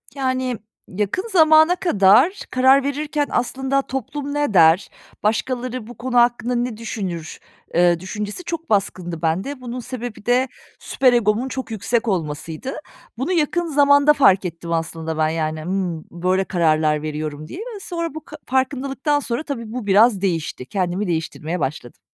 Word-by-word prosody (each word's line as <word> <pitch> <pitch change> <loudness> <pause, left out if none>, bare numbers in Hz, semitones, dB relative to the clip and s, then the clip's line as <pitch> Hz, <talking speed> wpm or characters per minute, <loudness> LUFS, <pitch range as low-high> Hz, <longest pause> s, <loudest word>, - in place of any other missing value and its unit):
Yani, 255 -3 -1 0.3
yakın 210 - -2
zamana 315 0 +6
kadar 310 - +4
karar 265 +2 +5
verirken 290 +1 -1
aslında 265 +2 0
toplum 275 +2 -5
ne 290 -6 0
der, 165 0 +5 0.3
başkaları 245 +2 -1
bu 240 - -11
konu 245 0 -2
hakkında 240 0 +3
ne 240 -2 -2
düşünür, 190 -8 -5 0.4
ııı, 175 -1 +4
düşüncesi 210 - -5
çok 335 -1 -5
baskındı 185 -5 -1
bende. 190 - -1
Bunun 250 0 -5
sebebi 245 -4 -7
de 250 +2 +3 0.3
süper 255 -2 +2
egomun 230 +1 +2
çok 260 -2 -5
yüksek 225 +2 -1
olmasıydı. 165 - -3 0.4
Bunu 265 +9 -2
yakın 345 0 +1
zamanda 285 -1 +5
fark 195 -10 +4
ettim 170 -1 -6
aslında 165 -1 -3
ben, 155 0 +2
yani, 155 -1 -2
ımm, 180 -2 -2
böyle 185 +2 0
kararlar 155 -4 +1
veriyorum 155 0 -5
diye 350 - -8
ve 450 -1 -7
sonra 335 -5 -4
bu 315 - -8
ka 305 - -10
farkındalıktan 270 +2 0
sonra 245 0 -3
tabii 235 -8 -5
bu 245 -2 -5
biraz 205 +1 +4
değişti. 165 -8 -2
Kendimi 185 +4 -2
değiştirmeye 165 0 -3
başladım. 135 -4 -4
230 Hz, 150 wpm, -21 LUFS, 175-270 Hz, 0.4 s, zamana